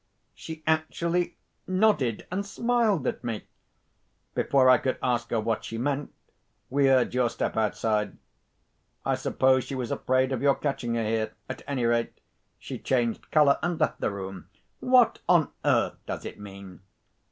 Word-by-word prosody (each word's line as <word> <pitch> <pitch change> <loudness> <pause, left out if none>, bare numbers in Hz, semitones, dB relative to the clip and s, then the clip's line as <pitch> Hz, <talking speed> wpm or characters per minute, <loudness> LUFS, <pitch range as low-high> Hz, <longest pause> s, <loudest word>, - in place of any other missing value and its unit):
She 160 -1 -9
actually 165 +2 0 0.3
nodded 185 - +2
and 195 +2 -1
smiled 220 - +1
at - - -2
me! 115 -3 -3 0.9
Before 135 -2 +3
I 130 -2 +7
could 130 - -1
ask 120 -1 0
her 115 - +1
what 110 0 -1
she 115 - -5
meant, 140 +3 -2 0.6
we 140 0 +3
heard 130 -3 +3
your 125 -1 +2
step - - -3
outside. 105 0 0 0.9
I - - +2
suppose 130 -1 +2
she 135 - -6
was 125 -3 -3
afraid 130 +1 +1
of 130 -2 -2
your 140 -1 +4
catching 125 -5 -2
her 115 - 0
here. 110 0 -1
At - - -6
any 130 -4 -1
rate, 115 0 0 0.4
she - - -7
changed 120 -3 -1
colour, 150 -3 +4
and 175 0 -1
left - - 0
the - - +1
room. 95 -1 -7 0.3
What 250 -2 +4
on 170 -4 +4
earth - - +2
does - - -5
it - - -7
mean?" 100 -3 -10
130 Hz, 160 wpm, -27 LUFS, 115-155 Hz, 0.9 s, I